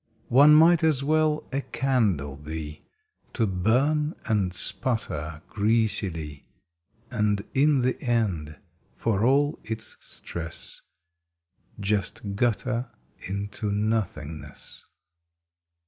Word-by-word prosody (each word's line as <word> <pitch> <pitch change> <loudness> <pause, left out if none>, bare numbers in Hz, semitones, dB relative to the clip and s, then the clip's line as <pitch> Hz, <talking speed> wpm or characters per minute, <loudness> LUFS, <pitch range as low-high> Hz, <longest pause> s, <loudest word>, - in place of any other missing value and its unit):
One 145 +4 +8
might 165 +1 +6
as 150 -4 +3
well 155 +1 +2
a 140 - 0
candle 105 - 0
be 75 +1 -7 0.5
To 115 - +1
burn 130 - +1
and 100 -4 +1
sputter 80 - -2
greasily 100 -9 0 0.6
And 105 -1 +1
in 145 0 +4
the 130 +1 0
end, 95 - -1 0.4
for 110 -3 0
all 140 +4 +3
its 110 0 -4
stress, 85 -1 -6 1.0
Just 100 0 -1
gutter 120 +3 0 0.4
into 100 +2 -3
Nothingness. 100 -8 -3
110 Hz, 90 wpm, -26 LUFS, 90-130 Hz, 1.0 s, One